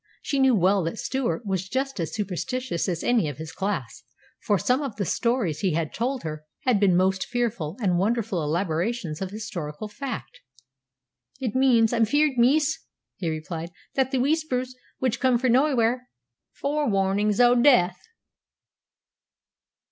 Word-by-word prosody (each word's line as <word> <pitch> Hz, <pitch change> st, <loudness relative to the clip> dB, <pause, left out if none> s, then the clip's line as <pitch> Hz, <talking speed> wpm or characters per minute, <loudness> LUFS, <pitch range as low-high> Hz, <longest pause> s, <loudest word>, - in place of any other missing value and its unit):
She 280 Hz, -, -1 dB
knew 265 Hz, -2 st, +5 dB
well 190 Hz, +1 st, +3 dB
that 165 Hz, +7 st, -3 dB
Stewart 255 Hz, -2 st, -2 dB
was 190 Hz, -1 st, -2 dB
just 270 Hz, -1 st, -2 dB
as 165 Hz, -, -2 dB
superstitious 210 Hz, 0 st, -2 dB
as 170 Hz, -2 st, -2 dB
any 230 Hz, -10 st, +2 dB
of 145 Hz, -, -7 dB
his 160 Hz, 0 st, -7 dB
class, 190 Hz, -, -3 dB, 0.4 s
for 205 Hz, -, +1 dB
some 250 Hz, -, +1 dB
of 270 Hz, -7 st, -4 dB
the 205 Hz, -2 st, -2 dB
stories 230 Hz, -, 0 dB
he 190 Hz, -5 st, +1 dB
had 160 Hz, -1 st, -2 dB
told 255 Hz, +3 st, -2 dB
her 155 Hz, -1 st, -5 dB, 0.2 s
had 245 Hz, -5 st, +2 dB
been 190 Hz, -3 st, +4 dB
most 190 Hz, +1 st, +1 dB
fearful 225 Hz, -9 st, -2 dB
and 185 Hz, -6 st, +1 dB
wonderful 215 Hz, -2 st, 0 dB
elaborations 170 Hz, +3 st, -1 dB
of 190 Hz, -, -2 dB
historical 190 Hz, -4 st, -6 dB
fact. 210 Hz, -, -6 dB, 1.0 s
"It 245 Hz, -6 st, -2 dB
means, 245 Hz, -4 st, +4 dB
I'm 230 Hz, -1 st, +3 dB
fear'd, 290 Hz, +2 st, +2 dB
miss," 300 Hz, +6 st, +3 dB, 0.4 s
he 170 Hz, -, -2 dB
replied, 160 Hz, +1 st, -5 dB, 0.2 s
"that 265 Hz, -1 st, +1 dB
the 265 Hz, -, -1 dB
Whispers 255 Hz, -2 st, 0 dB, 0.2 s
which 255 Hz, -3 st, -1 dB
come 255 Hz, -2 st, +3 dB
frae 250 Hz, 0 st, +1 dB
naewhere 255 Hz, -3 st, +3 dB
are 250 Hz, 0 st, -11 dB, 0.4 s
fore 290 Hz, -1 st, -1 dB
warnin's 200 Hz, +1 st, +1 dB
o' 245 Hz, 0 st, +6 dB
daith." 240 Hz, -8 st, +5 dB
220 Hz, 155 wpm, -25 LUFS, 180-255 Hz, 1.0 s, o